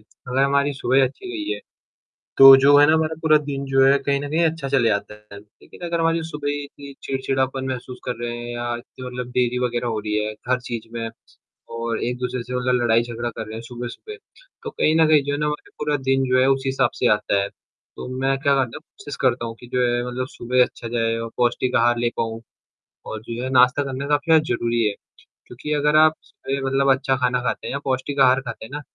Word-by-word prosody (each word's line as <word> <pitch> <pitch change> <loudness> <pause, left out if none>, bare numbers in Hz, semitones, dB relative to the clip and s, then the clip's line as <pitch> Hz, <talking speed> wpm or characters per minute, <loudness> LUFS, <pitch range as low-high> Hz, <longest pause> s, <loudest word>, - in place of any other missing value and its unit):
अगर 130 +2 -4
हमारी 140 +1 +2
सुबह 130 +1 +3
अच्छी 135 - -6
गई 330 +1 -3
है, - - -5 0.8
तो 135 0 +11
जो 140 +2 +5
है 145 - +7
ना 155 - +4
हमारा 160 0 0
पूरा 155 -1 +5
दिन 140 -2 -5
जो 135 0 +3
है 140 +1 +5
कहीं 140 0 -1
न 145 - -5
कहीं 165 +2 +2
अच्छा 160 -3 -1
चला 130 -4 +2
जाता 105 0 -2 0.2
है। 100 - -9
लेकिन 105 +10 -19
अगर 170 0 -1
हमारी 165 0 +1
सुबह 150 -2 -5
ही 145 0 -3
इतनी 140 0 -12
चिड़चिड़ापन 135 0 -2
महसूस 125 -1 -6
कर 125 - -3
रहे 120 0 -3
हैं 120 0 -7
या 120 0 -3
इतनी 125 +1 -11
मतलब 125 0 -6
देरी 125 0 +1
वगैरह 120 0 -3
हो 110 -2 -2
रही 105 0 -3
हैं 110 - -4
हर 125 0 +1
चीज़ 115 -2 -6
में 115 -1 -3 0.7
और 115 0 -3
एक-दूसरे 125 0 -3
से 125 +1 -7
मतलब 125 0 +1
लड़ाई-झगड़ा 120 0 0
कर 115 0 -6
रहे 110 - -8
हैं 115 - -6
सुबह 120 0 -7
सुबह। 430 - -10 0.5
तो 455 - -5
कहीं 155 - +1
न 160 - +6
कहीं 150 -2 +5
जो 145 - -2
है 145 - -2
ना 150 - 0
हमारा 150 0 -4
पूरा 150 0 0
दिन 135 0 +3
जो 130 0 +4
है 130 - +4
उसी 135 0 +1
हिसाब 135 - +1
से - - 0
आता 100 -1 +1
है। 100 - -3 0.5
तो - - -7
मैं 135 0 +1
क्या 140 0 +2
करता 130 -4 -1
हूँ, - - -11
कोशिश 145 -2 -10
करता 125 -2 +1
हूँ 115 - -6
कि 120 - -11
जो 125 - +1
है 120 0 +1
मतलब 125 +1 -3
सुबह 125 0 +1
अच्छा 115 - -9
जाए 115 -1 0
और 115 0 -5
पौष्टिक 125 +1 0
आहार 120 +1 +3
ले 120 0 +1
पाऊँ। 115 0 -3 0.7
और 110 - -5
जो 115 +1 -6
है 130 - -2
नाश्ता 125 +2 +5
करने 135 +1 -4
का 145 - +3
अपना 160 +2 +4
ज़रूरी 120 -5 0
है। 105 - 0 0.5
क्योंकि 125 +5 -7
अगर 150 +1 +2
आप 155 0 +6
सही 135 +1 -5
मतलब 135 0 +2
अच्छा 135 0 +1
खाना 125 -1 0
खाते 125 - -3
हैं - - -4
या 140 - -2
पौष्टिक 135 +2 -2
आहार 130 +1 +5
खाते 115 -3 -7
हैं 110 - -14
ना। 145 +1 -5
130 Hz, 240 wpm, -22 LUFS, 120-140 Hz, 0.8 s, तो